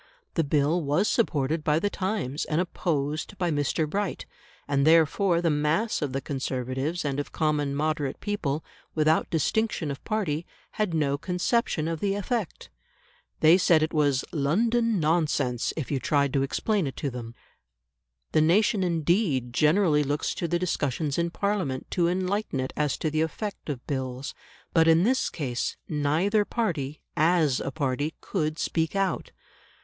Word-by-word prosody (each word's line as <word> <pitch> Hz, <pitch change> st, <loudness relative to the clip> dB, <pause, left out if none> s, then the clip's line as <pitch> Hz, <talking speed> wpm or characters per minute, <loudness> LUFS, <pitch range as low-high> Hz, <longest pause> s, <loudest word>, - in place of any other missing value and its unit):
The 165 Hz, -, +1 dB
Bill 150 Hz, +4 st, +2 dB
was 150 Hz, +8 st, +1 dB
supported 155 Hz, -, +1 dB
by 150 Hz, 0 st, +2 dB
the 205 Hz, +5 st, 0 dB
Times 185 Hz, -8 st, -2 dB
and 155 Hz, +1 st, 0 dB
opposed 155 Hz, -1 st, -2 dB
by 175 Hz, -2 st, 0 dB
Mr. 145 Hz, +2 st, 0 dB
Bright; 200 Hz, +4 st, -2 dB, 0.4 s
and 140 Hz, -1 st, +1 dB
therefore 165 Hz, +3 st, +4 dB
the 165 Hz, -, +3 dB
mass 150 Hz, +10 st, +1 dB
of 145 Hz, -3 st, -1 dB
the 135 Hz, +1 st, -2 dB
Conservatives 135 Hz, +4 st, -3 dB
and 140 Hz, -1 st, -1 dB
of 145 Hz, -, -4 dB
common 150 Hz, -3 st, 0 dB
moderate 150 Hz, -2 st, -1 dB
people, 160 Hz, -8 st, -2 dB, 0.3 s
without 155 Hz, 0 st, +2 dB
distinction 165 Hz, 0 st, 0 dB
of 140 Hz, -, -7 dB
party, 185 Hz, -8 st, -1 dB, 0.3 s
had 210 Hz, -6 st, -1 dB
no 140 Hz, -2 st, +1 dB
conception 180 Hz, -1 st, 0 dB
of 165 Hz, -1 st, -2 dB
the 200 Hz, +2 st, 0 dB
effect. 205 Hz, -1 st, -3 dB, 0.7 s
They 160 Hz, +4 st, +7 dB
said 165 Hz, -3 st, +4 dB
it 155 Hz, -, -2 dB
was 145 Hz, -4 st, +2 dB
"London 225 Hz, +9 st, +1 dB
nonsense" 150 Hz, -6 st, +1 dB
if 145 Hz, -7 st, -4 dB
you 140 Hz, -, +1 dB
tried 140 Hz, 0 st, +1 dB
to 135 Hz, -, +2 dB
explain 190 Hz, +6 st, 0 dB
it 135 Hz, -, -6 dB
to 140 Hz, -, -2 dB
them. 120 Hz, -1 st, -7 dB, 1.0 s
The 155 Hz, -, +3 dB
nation 195 Hz, +5 st, +3 dB
indeed 165 Hz, -, +1 dB
generally 155 Hz, +1 st, +3 dB
looks 145 Hz, +1 st, -1 dB
to 170 Hz, -, -3 dB
the 175 Hz, -, +1 dB
discussions 150 Hz, -4 st, -1 dB
in 170 Hz, 0 st, +1 dB
Parliament 185 Hz, -9 st, -2 dB
to 175 Hz, -2 st, +2 dB
enlighten 185 Hz, -2 st, -1 dB
it 130 Hz, 0 st, -3 dB
as 150 Hz, -2 st, 0 dB
to 155 Hz, -, -2 dB
the 155 Hz, +1 st, +1 dB
effect 195 Hz, +4 st, -4 dB
of 130 Hz, -4 st, -4 dB
Bills. 130 Hz, 0 st, -4 dB, 0.4 s
But 165 Hz, -1 st, +5 dB
in 165 Hz, +1 st, +5 dB
this 255 Hz, +5 st, +2 dB
case 125 Hz, -6 st, -3 dB
neither 160 Hz, +8 st, +1 dB
party, 160 Hz, -, -2 dB
as 160 Hz, -4 st, +3 dB
a -, -, -3 dB
party, 145 Hz, +1 st, -2 dB
could 155 Hz, -5 st, -2 dB
speak 165 Hz, +1 st, -1 dB
out. 195 Hz, -1 st, 0 dB
155 Hz, 160 wpm, -26 LUFS, 145-180 Hz, 1.0 s, They